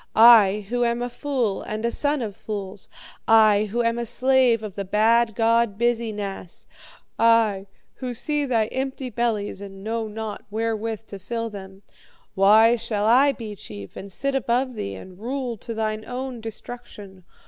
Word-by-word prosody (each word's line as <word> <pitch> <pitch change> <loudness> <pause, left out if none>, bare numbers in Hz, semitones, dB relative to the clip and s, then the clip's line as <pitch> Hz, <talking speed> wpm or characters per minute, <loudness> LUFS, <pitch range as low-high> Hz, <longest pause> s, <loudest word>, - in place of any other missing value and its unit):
I, 215 -3 +7
who 245 0 0
am 235 0 0
a 245 - -3
fool 245 -8 -1
and 215 +2 -4
a 235 - +1
son 290 -1 0
of 205 -3 -5
fools; 200 -3 -6 0.4
I, 215 -2 +5
who 235 +3 -1
am 230 0 +1
the 235 - -2
slave 255 -2 +3
of 210 -3 -6
the 200 - -4
bad 220 +3 +2
god 230 -2 +2
Biz 240 0 +1
e 225 -2 -3
Nass; 200 -4 -7 0.5
I, 225 -4 +3 0.3
who 255 -2 -4
see 295 +4 -1
thy 230 -4 +2
empty 265 -1 -4
bellies 215 -4 -1
and 195 -1 -10
knew 225 0 -3
not 215 0 -6
wherewith 225 0 -3
to 200 - -8
fill 230 +3 -4
them 190 -1 -10 0.5
why 220 +4 +5
shall 210 -2 -2
I 260 +6 +5
be 225 -5 -7
chief, 100 - -10
and 195 0 -8
sit 275 +8 -2
above 255 0 0
thee, 100 - -5
and 180 - -12
rule 250 +1 -3
to 230 - -8
thine 215 0 -2
own 250 +1 -5
destruction? 215 -4 -9
225 Hz, 170 wpm, -23 LUFS, 205-240 Hz, 0.5 s, I